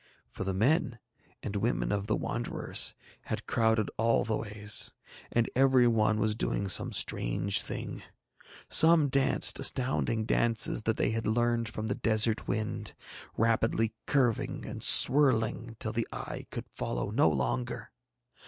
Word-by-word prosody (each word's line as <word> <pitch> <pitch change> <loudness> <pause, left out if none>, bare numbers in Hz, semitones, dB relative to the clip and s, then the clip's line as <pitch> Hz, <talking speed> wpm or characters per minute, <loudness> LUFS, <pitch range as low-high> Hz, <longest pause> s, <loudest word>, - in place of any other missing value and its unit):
For - - -6
the 95 0 -3
men 125 - +1 0.5
and 105 - -5
women 115 +4 -1
of 100 0 -2
the 110 - 0
Wanderers 120 0 -1 0.3
had - - -5
crowded 110 -2 0
all 115 +1 +1
the 110 - -1
ways, 105 -1 +1 0.4
and 115 -1 +1
every 130 -1 +4
one 110 -2 +1
was 110 0 0
doing 100 -2 -2
some - - +2
strange 95 +12 +1
thing. - - -6 0.7
Some 160 -3 +4
danced 135 0 +2
astounding 125 -3 0
dances 115 -1 +1
that 110 - 0
they - - 0
had 115 0 -3
learned 120 0 0
from 110 0 -6
the - - -2
desert 110 0 0
wind, 110 -1 -4 0.4
rapidly 115 0 0
curving 125 -6 -1
and - - -6
swirling 120 -5 +5
till 110 - -1
the 115 0 -2
eye - - -7
could - - -7
follow - - -5
no 80 - +3
longer. 80 - -3
115 Hz, 145 wpm, -29 LUFS, 110-120 Hz, 0.7 s, swirling